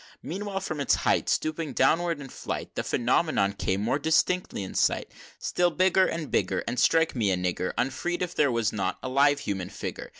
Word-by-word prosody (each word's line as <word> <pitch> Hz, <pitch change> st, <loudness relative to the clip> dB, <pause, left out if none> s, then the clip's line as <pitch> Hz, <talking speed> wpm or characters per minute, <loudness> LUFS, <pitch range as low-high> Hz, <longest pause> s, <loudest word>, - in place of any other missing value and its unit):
XV. -, -, -23 dB
Meanwhile, 195 Hz, +2 st, -3 dB
from 155 Hz, -5 st, -4 dB
its 140 Hz, -, +3 dB
height -, -, +1 dB
Stooping 155 Hz, -2 st, -1 dB
downward 165 Hz, +5 st, +2 dB
in 140 Hz, -, -8 dB
flight, -, -, -5 dB
The -, -, -2 dB
Phenomenon 120 Hz, -4 st, +1 dB
came 95 Hz, -1 st, -1 dB
more 130 Hz, +6 st, +1 dB
distinctly 160 Hz, -, +1 dB
in 95 Hz, -, -7 dB
sight: -, -, +1 dB, 0.3 s
Still 175 Hz, 0 st, +1 dB
bigger 185 Hz, +2 st, +3 dB
and 165 Hz, -3 st, -4 dB
bigger, -, -, 0 dB
And 125 Hz, -, -2 dB
strike 165 Hz, +2 st, +3 dB
me 110 Hz, -5 st, +1 dB
a 95 Hz, -, +1 dB
nigger 90 Hz, 0 st, -1 dB
Unfreed, 155 Hz, +9 st, -1 dB
if 180 Hz, -1 st, -4 dB
there 145 Hz, -3 st, +2 dB
was 115 Hz, -3 st, 0 dB
not 95 Hz, -3 st, -2 dB
a 130 Hz, -, -3 dB
live 140 Hz, +2 st, +3 dB
human 95 Hz, -3 st, -3 dB
figure! -, -, -6 dB
145 Hz, 200 wpm, -27 LUFS, 115-170 Hz, 0.3 s, its